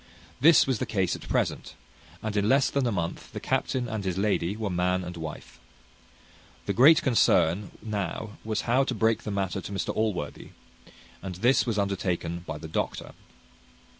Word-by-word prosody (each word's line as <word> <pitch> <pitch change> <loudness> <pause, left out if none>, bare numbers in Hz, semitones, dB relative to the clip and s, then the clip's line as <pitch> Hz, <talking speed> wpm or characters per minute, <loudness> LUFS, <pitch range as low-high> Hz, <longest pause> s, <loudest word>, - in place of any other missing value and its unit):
This 160 +4 +7
was 130 -4 0
the 130 - -2
case 95 -5 0
at - - -10
present, - - -1 0.5
and 110 -1 -3
in 105 +1 +2
less 135 0 +4
than 140 -3 +1
a - - 0
month 85 -4 -4
the - - -4
captain 125 -2 -1
and 110 -3 -4
his 95 -2 -2
lady 100 -1 0
were 105 -3 -2
man 90 +1 0
and 90 0 -7
wife. 80 -2 -8 1.1
The - - -1
great 145 +6 +6
concern 105 - +3
now 105 0 -3
was 110 -1 -1
to 130 +1 +1
break 110 +1 +2
the - - -6
matter 100 -1 -2
to 100 - -8
Mr 100 - -2
Allworthy; 105 -9 -3 0.7
and 95 -2 -6
this 125 +8 +3
was 115 -3 -1
undertaken 95 -4 -1
by 80 - -4
the 80 - -8
doctor. 80 - -3
105 Hz, 170 wpm, -27 LUFS, 90-115 Hz, 1.1 s, This